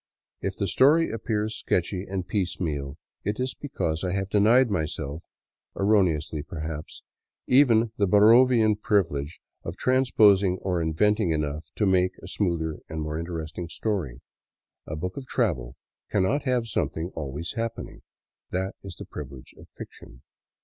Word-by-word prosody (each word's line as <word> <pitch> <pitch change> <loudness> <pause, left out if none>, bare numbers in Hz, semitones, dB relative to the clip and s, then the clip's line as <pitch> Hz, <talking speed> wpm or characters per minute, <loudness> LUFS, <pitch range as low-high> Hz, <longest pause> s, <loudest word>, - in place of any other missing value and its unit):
If - - -2
the - - -1
story 155 +5 +4
appears 110 -1 -2
sketchy 90 +2 -1
and 95 -2 -3
piecemeal, 80 -8 -2 0.3
it 105 +3 -2
is 130 0 -1
because 85 - -3
I 90 -1 -1
have 95 0 -2
denied 115 +4 +4
myself, 80 -3 -3 0.6
erroneously 85 -7 +2
perhaps, 80 0 -7 0.4
even 120 -4 +4
the 100 - +2
Bar 100 +2 +4
rovian 115 -2 +5
privilege 80 -8 0 0.2
of 85 +3 -6
transposing 105 -7 +4
or 90 -3 0
inventing 105 +5 +2
enough 75 -1 -2
to 105 - +1
make 95 -1 +3
a - - -11
smoother 85 -5 -1
and 80 0 -4
more 75 +1 -3
interesting 85 0 -5
story. 85 - -3 0.7
A 75 - -4
book 90 +4 -5
of 135 -2 -7
travel 70 - -1 0.3
cannot 105 +10 +1
have 125 -3 +1
something 90 -5 -2
always 75 +2 -5
happening; 115 0 -5 0.5
that 95 +1 -2
is 95 -3 -9
the - - -9
privilege 70 -3 -9
of - - -15
fiction. - - -12
95 Hz, 140 wpm, -26 LUFS, 80-110 Hz, 0.7 s, rovian